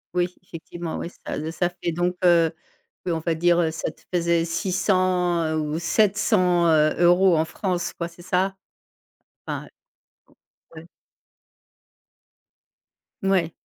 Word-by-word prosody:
Oui, 175 0 +2
effectivement, 170 -1 -7
oui, 170 - -5
ça 155 +2 -4
ça 175 +1 0
fait 175 -1 -4
donc 175 +2 -1
heu 170 -2 +5 0.5
oui 180 - -1
on 165 - 0
va 165 0 -1
dire, 175 +1 +3
heu, 165 - +2
ça 165 - -4
te - - -25
faisait 170 -1 +2
600, 180 -1 +1
heu, 155 - -1
ou 150 +1 -2
700, 185 -1 +2
heu, 155 -1 +4
euros 175 0 +5
en 160 - +2
France 180 -1 -3
quoi, 170 - -4
c'est 170 +1 -15
ça? 185 +1 0 0.9
Enfin - - -4 0.6
ou - - -26 0.5
ouais. 165 - -15 2.4
Mouais. 185 -4 +1
175 Hz, 135 wpm, -24 LUFS, 165-180 Hz, 2.4 s, heu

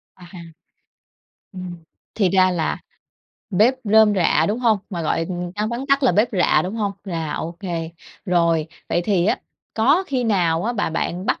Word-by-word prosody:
À. 180 - -14 1.3
Ừm, 185 -2 -7 0.4
thì 200 -5 +2
ra 185 0 +4
là 170 -3 -1 0.7
bếp 215 +7 +4
rơm 215 0 +5
rạ, 180 -4 +3
đúng 215 +4 -1
hông? 230 -4 +2
Mà 170 -4 -3
gọi, 165 +1 0
ừm, 175 -1 -4
văn 210 +1 -1
vắn 240 +4 -4
tắt 275 0 +2
là 255 - +4
bếp 215 +4 +3
rạ, 185 -3 +3
đúng 190 +4 -4
hông? 205 -3 -1
Là 165 -5 -3
OK. 170 +1 -5 0.7
Rồi, 170 -4 +2 0.2
vậy 175 - 0
thì 185 -3 +1
á, - - +1 0.4
có 280 +12 +3
khi 255 -5 -1
nào 175 -6 +1
á 240 - 0
mà 205 -7 -1
bạn 175 +3 -3
bắt - - 0
190 Hz, 180 wpm, -21 LUFS, 175-220 Hz, 1.3 s, rơm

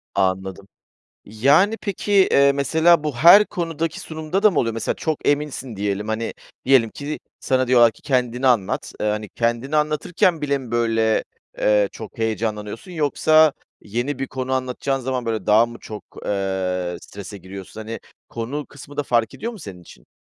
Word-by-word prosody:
Anladım. 95 0 -1 0.6
Yani, 145 - +3
peki, 205 -1 -4 0.2
eee, 140 0 +5
mesela 160 +3 +3
bu 150 -5 -2
her 175 - +8
konudaki 165 -3 -3
sunumda 160 +4 -3
da 215 - +7
mı 175 - -1
oluyor? 115 -2 0
Mesela 115 - -2
çok 160 -2 -3
eminsin 145 -5 -1
diyelim, 100 +1 -2
hani, 110 +1 -2 0.3
diyelim 130 -4 +4
ki, 145 +5 -5 0.2
sana 130 -1 +1
diyorlar 120 -2 +6
ki: - - -22
"Kendini 125 -1 0
anlat." 115 -7 +1
Eee, - - 0
hani, 105 0 -2
kendini 120 +7 -1
anlatırken 155 +3 +1
bile 140 -1 0
mi, 130 -4 -10
böyle, 115 -2 +1 0.3
eee, 105 -1 +3
çok 110 -1 -10
heyecanlanıyorsun, 110 - -3
yoksa 155 0 +4 0.3
yeni 120 +6 -3
bir 135 - -2
konu 130 0 -4
anlatacağın 130 +1 -1
zaman, 130 -1 -2
böyle, 110 -1 -2
daha 110 +2 +5
mı 120 0 -10
çok, 105 -1 -9 0.2
eee, 95 -3 -2
strese 100 0 -10
giriyorsun? 95 +3 -10
Hani, 110 +1 -6 0.3
konu 130 +6 -5
kısmı 145 0 -13
da - - 0
fark 120 -4 0
ediyor 235 - -5
mu 225 - -10
senin 95 - -10
için? - - -17
125 Hz, 165 wpm, -22 LUFS, 110-150 Hz, 0.6 s, her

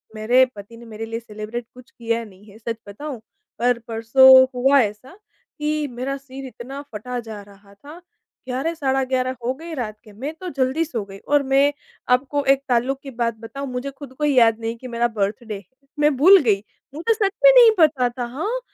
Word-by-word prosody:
मेरे 245 +4 +4
पति 205 +3 -11
ने 235 - -13
मेरे 225 0 -7
लिए 225 0 -5
सेलिब्रेट 225 +1 -7
कुछ 250 0 -16
किया 230 0 -2
नहीं 200 0 -17
है, 215 - -15
सच 230 0 -5
बताऊँ, 265 +5 -7 0.4
पर 245 0 +2
परसों 260 +4 +7
हुआ 270 +3 +4
ऐसा 215 - -5 0.4
कि 300 0 -1
मेरा 255 +3 -4
सिर 270 0 -10
इतना 265 +3 -8
फटा 245 +4 -5
जा 220 -3 -8
रहा 200 0 -19
था 295 - -13 0.5
11 265 +6 -2
साढ़ा 270 -4 0
11 255 0 -1
हो 255 - 0
गई 325 +2 -9
रात 215 -5 -4
के, 215 - -16
मैं 275 +9 -5
तो 365 +3 -8
जल्दी 265 +5 +1
सो 235 -10 -4
गई 195 0 -11
और 290 +4 +1
मैं 280 +2 +4 0.4
आपको 275 +3 0
एक 275 0 -5
ताल्लुक 255 +3 +1
की 275 - -8
बात 235 -1 -2
बताऊँ, 275 +5 -7
मुझे 250 +3 -4
ख़ुद 275 -1 -12
को 300 +3 -6
ही 290 -2 +2
याद 225 -1 +5
नहीं 225 0 -3
कि 255 - -10
मेरा 235 0 0
बर्थडे 215 0 -3
है। 260 +9 -16
मैं 295 -2 +3
भूल 375 +7 +8
गई, 205 -4 +1 0.3
मुझे 345 +9 +1
सच 410 -3 0
में - - +10
नहीं 485 -3 +8
पता 280 -6 +4
था, 240 0 -5
हाँ, 360 - -3
255 Hz, 205 wpm, -21 LUFS, 225-280 Hz, 0.5 s, में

